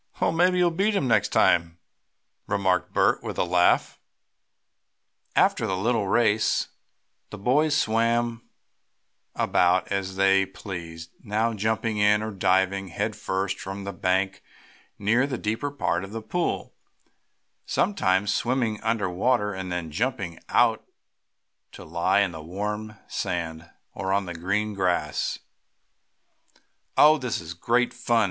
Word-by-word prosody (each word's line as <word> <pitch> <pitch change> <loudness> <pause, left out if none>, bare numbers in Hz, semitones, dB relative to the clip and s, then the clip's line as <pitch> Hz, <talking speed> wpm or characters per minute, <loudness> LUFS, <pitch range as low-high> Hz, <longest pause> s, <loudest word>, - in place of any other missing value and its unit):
"Well, - - +2
maybe 180 +3 +3
you'll 175 -1 +3
beat 200 +5 +1
him 140 - +1
next 120 - +3
time," 85 -1 +2 0.7
remarked 95 -3 0
Bert, - - +2
with - - -6
a - - +2
laugh. 90 0 +2 1.4
After - - +3
the 95 - -1
little 110 +1 0
race 110 -1 +2 0.6
the - - -8
boys 145 +8 +2
swam 115 +1 0 0.9
about 90 +1 +2
as 95 -1 -2
they 95 0 +3
pleased, 85 -4 -8
now 110 +2 0
jumping 110 +1 -1
in, 105 +1 +4
or 110 - -4
diving 95 0 +1
head 85 - -3
first 95 0 -2
from 95 +1 -6
the 100 0 -5
bank 95 +1 0 0.6
near 115 +6 +2
the 130 -3 -3
deeper 110 +7 -2
part 95 -11 -1
of 95 +2 -9
the 115 - -4
pool, 175 +10 -2 0.9
sometimes 100 - +1
swimming 120 -4 -1
under 110 -3 0
water, 105 +3 +1
and 95 -1 -5
then 85 -3 -4
jumping 100 - -2
out - - +3 0.9
to - - -10
lie 85 +5 +2
in 100 -3 +1
the 80 -2 -8
warm 105 +5 -4
sand, 85 -1 -4 0.2
or 95 0 -3
on 100 0 +1
the 90 - -6
green 100 +5 -1
grass. 90 -6 -1 1.6
"Oh, 155 +1 +7
this 125 -3 -2
is 85 0 -7
great 120 +8 +1
fun!" 120 -1 +1
100 Hz, 135 wpm, -25 LUFS, 95-115 Hz, 1.6 s, Oh